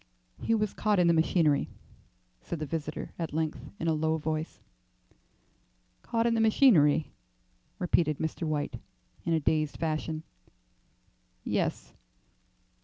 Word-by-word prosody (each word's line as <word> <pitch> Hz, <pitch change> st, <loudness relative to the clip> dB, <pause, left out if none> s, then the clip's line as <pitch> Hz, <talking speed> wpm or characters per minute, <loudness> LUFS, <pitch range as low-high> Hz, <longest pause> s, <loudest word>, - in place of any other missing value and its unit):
"He 230 Hz, -, +2 dB
was 215 Hz, -2 st, 0 dB
caught 210 Hz, -1 st, +1 dB
in 180 Hz, -, +4 dB
the 170 Hz, -, +5 dB
machinery," 160 Hz, -2 st, +2 dB, 0.7 s
said 170 Hz, -, -5 dB
the 155 Hz, -, -3 dB
visitor 155 Hz, 0 st, -4 dB
at 160 Hz, -3 st, -3 dB
length 160 Hz, -1 st, -2 dB
in 165 Hz, -, -2 dB
a 160 Hz, -, +3 dB
low 160 Hz, +1 st, +1 dB
voice. 155 Hz, +1 st, -3 dB, 1.4 s
"Caught 230 Hz, 0 st, 0 dB
in 235 Hz, -, +3 dB
the 225 Hz, -, +2 dB
machinery," 200 Hz, -, +5 dB, 0.7 s
repeated 165 Hz, -4 st, +1 dB
Mr. 160 Hz, +1 st, -3 dB
White, 150 Hz, -1 st, -2 dB, 0.5 s
in 170 Hz, -, +1 dB
a 160 Hz, -, +3 dB
dazed 155 Hz, 0 st, 0 dB
fashion, 155 Hz, 0 st, -2 dB, 1.2 s
"yes." -, -, -2 dB
160 Hz, 125 wpm, -29 LUFS, 155-175 Hz, 1.4 s, the